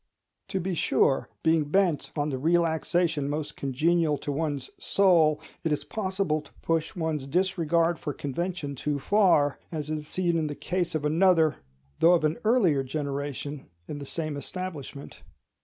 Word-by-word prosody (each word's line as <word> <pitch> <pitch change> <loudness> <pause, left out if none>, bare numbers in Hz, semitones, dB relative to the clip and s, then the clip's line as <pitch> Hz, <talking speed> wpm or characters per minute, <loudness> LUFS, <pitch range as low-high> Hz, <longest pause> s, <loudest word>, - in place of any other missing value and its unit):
To 190 - -2
be 185 +1 -2
sure, 140 -4 +2
being 160 -1 +3
bent 175 0 +1
on 145 -1 0
the 130 -3 -3
relaxation 165 -1 +1
most 150 0 -3
congenial 155 +3 +1
to 145 - -4
one's 145 -3 -3
soul, 165 -6 +3 0.2
it 165 - 0
is 150 - 0
possible 190 -6 -1
to 150 - -18
push 165 -1 0
one's 160 -5 -2
disregard 170 0 +1
for 150 - -3
convention 150 +2 -3
too 145 +2 -2
far: 160 -4 +3
as 155 -2 -4
is 150 -1 -3
seen 170 0 0
in 155 - -1
the 145 - -5
case 180 0 -2
of 150 -1 -1
another, 160 0 +4 0.4
though 170 +2 +6
of 165 - 0
an 155 +1 +1
earlier 200 - +3
generation, 140 0 -4 0.2
in 145 - -5
the 140 - -8
same 155 -1 -3
establishment. 150 -4 -7
155 Hz, 155 wpm, -27 LUFS, 145-175 Hz, 0.4 s, though